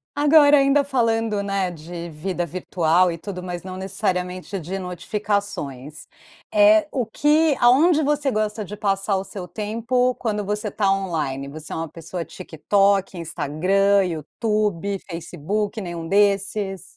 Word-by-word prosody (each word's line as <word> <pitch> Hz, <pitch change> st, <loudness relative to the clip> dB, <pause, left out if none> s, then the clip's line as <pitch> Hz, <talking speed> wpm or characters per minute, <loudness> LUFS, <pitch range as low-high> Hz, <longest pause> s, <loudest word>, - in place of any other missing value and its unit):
Agora, 295 Hz, 0 st, +6 dB
ainda 275 Hz, +1 st, +4 dB
falando, 225 Hz, -6 st, 0 dB
né, 195 Hz, -2 st, -1 dB
de 170 Hz, +1 st, -8 dB
vida 175 Hz, +3 st, -3 dB
virtual 175 Hz, +1 st, +1 dB
e 165 Hz, -, -5 dB
tudo, 180 Hz, +1 st, -7 dB
mas 175 Hz, -1 st, -5 dB
não 185 Hz, 0 st, -7 dB
necessariamente 185 Hz, -1 st, -3 dB
de 185 Hz, +4 st, -5 dB
notificações, 180 Hz, -6 st, -4 dB, 0.5 s
eh, 315 Hz, 0 st, +6 dB
o 250 Hz, -4 st, -1 dB
que 300 Hz, +2 st, +2 dB
aonde 295 Hz, +7 st, +5 dB
você 290 Hz, -1 st, +1 dB
gosta 215 Hz, 0 st, -2 dB
de 210 Hz, -, -7 dB
passar 195 Hz, -1 st, 0 dB
o 190 Hz, -, -3 dB
seu 190 Hz, -2 st, -8 dB
tempo 230 Hz, +5 st, 0 dB
quando 210 Hz, -3 st, -2 dB
você 210 Hz, +1 st, -2 dB
tá 200 Hz, -2 st, +1 dB
on-line? 155 Hz, -8 st, -2 dB
Você 155 Hz, +1 st, -10 dB
é -, -, -3 dB
uma 165 Hz, 0 st, -3 dB
pessoa 165 Hz, +2 st, -6 dB
TikTok, 195 Hz, +2 st, 0 dB
Instagram, 185 Hz, +5 st, +1 dB
YouTube, 200 Hz, -, -2 dB
Facebook, 180 Hz, +6 st, -3 dB
nenhum 170 Hz, -2 st, -5 dB
desses? 200 Hz, -1 st, +1 dB
195 Hz, 140 wpm, -22 LUFS, 175-215 Hz, 0.5 s, Agora